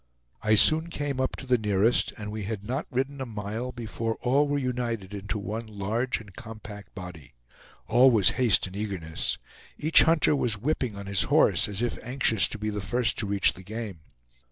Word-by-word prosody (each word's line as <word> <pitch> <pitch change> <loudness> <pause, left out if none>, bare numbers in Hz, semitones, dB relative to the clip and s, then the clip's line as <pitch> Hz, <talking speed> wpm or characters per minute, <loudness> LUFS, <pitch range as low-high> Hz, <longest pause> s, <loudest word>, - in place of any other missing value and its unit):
I 110 0 +3
soon 160 +9 +5
came 145 -5 -3
up 130 - -1
to - - -8
the 125 -2 +2
nearest, 105 +2 +2
and 105 -2 -6
we 110 0 -5
had 105 -1 -4
not 130 +7 -3
ridden 135 +2 -2
a - - -2
mile 110 +3 -5
before 115 -1 -4
all 140 +4 +3
were 145 0 0
united 120 -6 -3
into 100 +1 -4
one 110 +3 -5
large 110 +4 -2
and 105 -4 -14
compact 105 -1 -10
body. 80 -8 -10 0.5
All 130 +2 +5
was 110 -6 +5
haste 125 -5 +2
and 95 0 -9
eagerness. 95 -6 -3 0.4
Each 155 +2 +6
hunter 160 -2 +4
was 120 -6 0
whipping 125 -2 -2
on 100 0 -8
his 100 -1 +1
horse, - - +3
as 105 +3 -2
if 120 - -2
anxious 125 -4 +2
to - - -6
be 105 0 -3
the 105 -1 -4
first 120 +5 0
to 105 - -1
reach 100 -1 +3
the 95 - -12
game. 105 -2 -6
110 Hz, 195 wpm, -27 LUFS, 100-125 Hz, 0.5 s, Each